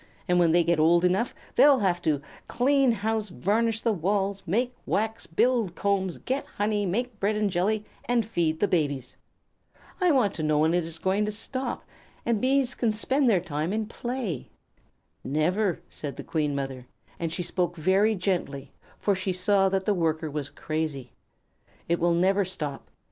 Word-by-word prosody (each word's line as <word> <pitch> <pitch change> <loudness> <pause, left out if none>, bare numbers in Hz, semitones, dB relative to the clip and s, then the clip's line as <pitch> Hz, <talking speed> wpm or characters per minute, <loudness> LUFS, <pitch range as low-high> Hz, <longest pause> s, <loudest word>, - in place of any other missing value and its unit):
And 180 0 +3
when 170 -2 +4
they 175 +1 +4
get 170 -1 +1
old 170 +3 +4
enough 190 +7 +1 0.2
they'll 285 -1 +7
have 185 -6 +1
to 150 -4 0 0.2
clean 270 0 +3
house, 220 -1 -1
varnish 220 +5 0
the 230 - +1
walls, 195 +2 -1
make 240 +8 0
wax, 220 +2 -1
build 225 +1 +1
combs, 195 -3 0
get 265 +2 -2
honey, 205 -1 0
make 235 +4 -2
bread 205 +2 +1
and 210 -2 0
jelly, 205 +4 0 0.2
and 240 -2 +1
feed 165 -7 0
the 205 - +4
babies. 145 -8 -1 0.9
I 360 - +4
want 255 - +3
to 165 - -5
know 155 -1 +2
when 160 +2 +3
it 175 -2 +1
is 165 0 -6
going 190 +4 +1
to 210 - -2
stop, 255 +5 -4 0.4
and 230 -3 +1
Bees 265 -1 +2
can 230 -3 0
spend 260 +5 +2
their 195 -5 +4
time 160 -1 -3
in 215 +1 -1
play." 230 - -4 0.7
"Never," 175 +6 0
said 145 -2 -6
the - - -7
Queen 150 -3 -1
Mother; 135 -2 -4 0.3
and 165 -1 -2
she 175 - -3
spoke 175 0 -1
very 190 +6 +3
gently, 155 -8 -2 0.3
for 205 - +1
she 190 0 -2
saw 195 +1 +3
that 190 0 -1
the 210 - +3
Worker 160 -3 -1
was 145 -1 -4
crazy. 150 -3 -4 0.8
"It 170 0 +1
will 170 0 +2
never 195 +3 +3
stop. 155 -7 -5
190 Hz, 175 wpm, -27 LUFS, 165-220 Hz, 0.9 s, they'll